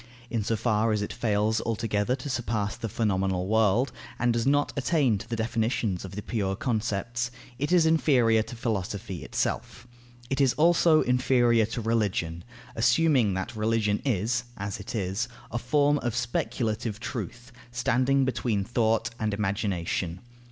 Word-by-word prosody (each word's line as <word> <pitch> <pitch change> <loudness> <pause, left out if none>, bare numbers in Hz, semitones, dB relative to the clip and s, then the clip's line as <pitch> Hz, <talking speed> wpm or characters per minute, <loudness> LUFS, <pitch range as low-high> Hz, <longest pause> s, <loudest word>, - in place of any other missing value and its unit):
In 115 -3 0
so 115 - 0
far 110 0 +1
as 105 -1 0
it - - -5
fails 110 -1 +1
altogether 115 +1 0
to 130 +2 -8
surpass 110 -6 -1
the 115 - -5
phenomenal 95 -4 0
world, 110 +4 +2 0.3
and 120 0 +2
does 115 +2 0
not 145 +1 +2
attain 140 -6 +2
to 115 +2 -10
the 115 - -1
definitions 110 -3 -1
of 95 0 -8
the 105 - -5
pure 100 -5 -1
concepts, 115 +2 -1 0.3
it 145 +4 -1
is 175 -3 +5
inferior 130 -9 +4
to 120 - -7
Philosophy 100 -5 -3
itself. - - -3 0.5
It 135 +1 +1
is 135 -3 +4
also 165 0 +5
inferior 120 -3 +3
to 115 +1 -4
Religion, 100 -7 -1 0.3
assuming 120 - +3
that 105 +5 -4
religion 105 -1 +1
is 120 0 0
(as 100 0 -4
it 100 - -7
is) 100 +3 -1 0.2
a 120 - -1
form 145 +4 +2
of 120 -2 -2
speculative 115 -2 -2
truth, 120 +1 -6 0.2
standing 130 +2 +2
between 115 -5 0
thought 115 +1 +1
and 110 -2 0
imagination. 95 -4 -2
115 Hz, 150 wpm, -27 LUFS, 105-125 Hz, 0.5 s, is